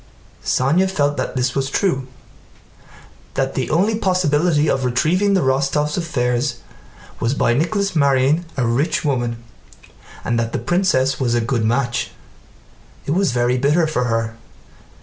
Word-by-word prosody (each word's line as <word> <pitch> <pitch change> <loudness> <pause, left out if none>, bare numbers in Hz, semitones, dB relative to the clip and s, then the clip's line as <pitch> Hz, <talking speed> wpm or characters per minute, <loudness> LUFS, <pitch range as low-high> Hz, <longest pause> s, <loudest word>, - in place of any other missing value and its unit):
Sónya 165 +9 +2
felt 145 -6 0
that - - -3
this 125 -1 0
was 135 -1 -1
true: 135 -6 0 1.3
that 135 0 -1
the 130 - -2
only 190 +8 +2
possibility 170 -6 +1
of 135 - 0
retrieving 175 +11 +1
the 185 - +2
Rostóvs' 140 +3 +1
affairs 125 -8 -1 0.6
was 120 +4 0
by 120 - +2
Nicholas 195 - 0
marrying 140 +2 +3
a 130 - +1
rich 125 +8 0
woman, 120 -4 -1 0.8
and 120 0 0
that 115 0 -2
the - - 0
princess 155 -8 +1
was 120 -3 +1
a - - +2
good 115 0 -1
match. 120 +2 0 1.0
It - - -2
was 185 +1 +2
very 120 +1 +1
bitter 150 +5 +2
for 140 -5 -1
her. 115 -1 -1
135 Hz, 145 wpm, -19 LUFS, 125-165 Hz, 1.3 s, marrying